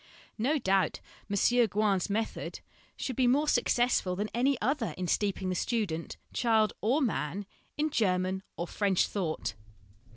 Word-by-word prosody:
No 275 Hz, +8 st, +2 dB
doubt 195 Hz, -7 st, +1 dB, 0.3 s
M. 200 Hz, -, -1 dB, 0.3 s
Gouin's 205 Hz, -1 st, +1 dB
method 220 Hz, +2 st, -3 dB, 0.4 s
should 260 Hz, -, -3 dB
be 255 Hz, 0 st, +3 dB
more 285 Hz, +5 st, +3 dB
successful 240 Hz, -10 st, +2 dB
than 205 Hz, +3 st, -3 dB
any 260 Hz, +2 st, +2 dB
other 255 Hz, +1 st, -1 dB
in 180 Hz, -1 st, -2 dB
steeping 195 Hz, -1 st, 0 dB
the -, -, 0 dB
student 180 Hz, -5 st, -2 dB, 0.2 s
(child 220 Hz, -3 st, +3 dB
or 265 Hz, +8 st, +2 dB
man) 200 Hz, -, -2 dB, 0.3 s
in 305 Hz, +1 st, 0 dB
German 185 Hz, -3 st, +1 dB, 0.2 s
or 170 Hz, -, -2 dB
French 195 Hz, 0 st, +1 dB
thought. 165 Hz, -, -2 dB
210 Hz, 140 wpm, -30 LUFS, 185-245 Hz, 0.4 s, be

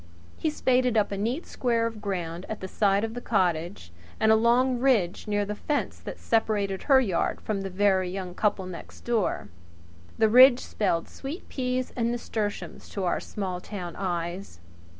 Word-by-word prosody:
He 315 Hz, -, -1 dB
spaded 250 Hz, -5 st, +2 dB
up 210 Hz, -, +2 dB
a -, -, -1 dB
neat 240 Hz, -, -2 dB
square 235 Hz, -2 st, 0 dB
of 225 Hz, -2 st, -4 dB
ground 175 Hz, -3 st, -4 dB
at 220 Hz, -, -4 dB
the 190 Hz, -, -5 dB
side 200 Hz, +1 st, +2 dB
of 225 Hz, 0 st, -2 dB
the 245 Hz, -, -6 dB
cottage 175 Hz, -, -1 dB, 0.3 s
and 220 Hz, -, +4 dB
a -, -, +7 dB
long 240 Hz, +3 st, +3 dB
ridge 225 Hz, -9 st, +1 dB
near 205 Hz, -1 st, +1 dB
the 210 Hz, -, -3 dB
fence 290 Hz, +7 st, -2 dB
that -, -, -7 dB
separated 205 Hz, -4 st, 0 dB
her 270 Hz, -2 st, +5 dB
yard 195 Hz, -10 st, 0 dB
from 210 Hz, -3 st, -3 dB
that 195 Hz, -, -3 dB
of 190 Hz, -, -9 dB
the -, -, -14 dB
very 190 Hz, -3 st, +3 dB
young 185 Hz, -1 st, -5 dB
couple 205 Hz, -1 st, 0 dB
next 185 Hz, -2 st, -9 dB
door. 225 Hz, -, -1 dB, 0.7 s
The 220 Hz, -, +4 dB
ridge 250 Hz, +3 st, +8 dB
spelled 170 Hz, -6 st, -1 dB
sweet 285 Hz, +6 st, -7 dB
peas 255 Hz, -1 st, -2 dB
and 235 Hz, -1 st, 0 dB
nasturtiums 220 Hz, -3 st, -4 dB
to 195 Hz, -, -3 dB
our 175 Hz, -, +1 dB
small 185 Hz, -3 st, -4 dB
town 180 Hz, -5 st, -6 dB
eyes. 175 Hz, -, -4 dB
210 Hz, 185 wpm, -27 LUFS, 185-240 Hz, 0.7 s, ridge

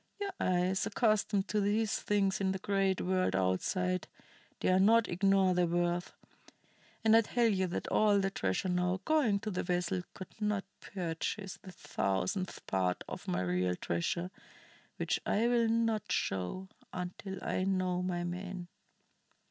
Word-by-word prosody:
Your 400 Hz, -1 st, -2 dB
eyes, 185 Hz, +1 st, +1 dB
accustomed 215 Hz, -3 st, +1 dB
to 210 Hz, -, +1 dB
these 210 Hz, +1 st, +1 dB
things 200 Hz, -2 st, +1 dB
in 190 Hz, -1 st, +1 dB
the -, -, -2 dB
great 195 Hz, 0 st, +1 dB
world 185 Hz, -, +1 dB
outside, 180 Hz, -, 0 dB, 0.5 s
dare 185 Hz, 0 st, +3 dB
not 225 Hz, +4 st, +5 dB
ignore 190 Hz, +1 st, +3 dB
their 180 Hz, -1 st, +2 dB
worth. 175 Hz, +1 st, 0 dB, 0.9 s
And 220 Hz, 0 st, +6 dB
I 225 Hz, -, +8 dB
tell 235 Hz, +2 st, +1 dB
ye 195 Hz, -4 st, +2 dB
that 175 Hz, -, -3 dB
all 210 Hz, -1 st, +4 dB
the 195 Hz, 0 st, 0 dB
treasure 95 Hz, -, -1 dB
now 180 Hz, +1 st, +1 dB
going 275 Hz, -11 st, +3 dB
to 215 Hz, -, -3 dB
the 180 Hz, -, -1 dB
vessel 180 Hz, +1 st, -1 dB
could 190 Hz, -, -9 dB
not 210 Hz, -1 st, 0 dB, 0.2 s
purchase 185 Hz, +2 st, -4 dB
the 185 Hz, -, -10 dB
thousandth 100 Hz, -, -2 dB
part 90 Hz, -1 st, 0 dB
of -, -, -7 dB
my 90 Hz, +1 st, 0 dB
real 90 Hz, 0 st, 0 dB
treasure, 170 Hz, -, -2 dB, 0.7 s
which -, -, 0 dB
I 225 Hz, +3 st, +2 dB
will 235 Hz, -1 st, +3 dB
not 225 Hz, -2 st, +1 dB
show, 95 Hz, -, -1 dB, 0.2 s
until 185 Hz, +2 st, -5 dB
I 185 Hz, -, -1 dB
know 185 Hz, -2 st, 0 dB
my 180 Hz, -1 st, -2 dB
man." 180 Hz, 0 st, -5 dB
185 Hz, 150 wpm, -32 LUFS, 175-205 Hz, 0.9 s, I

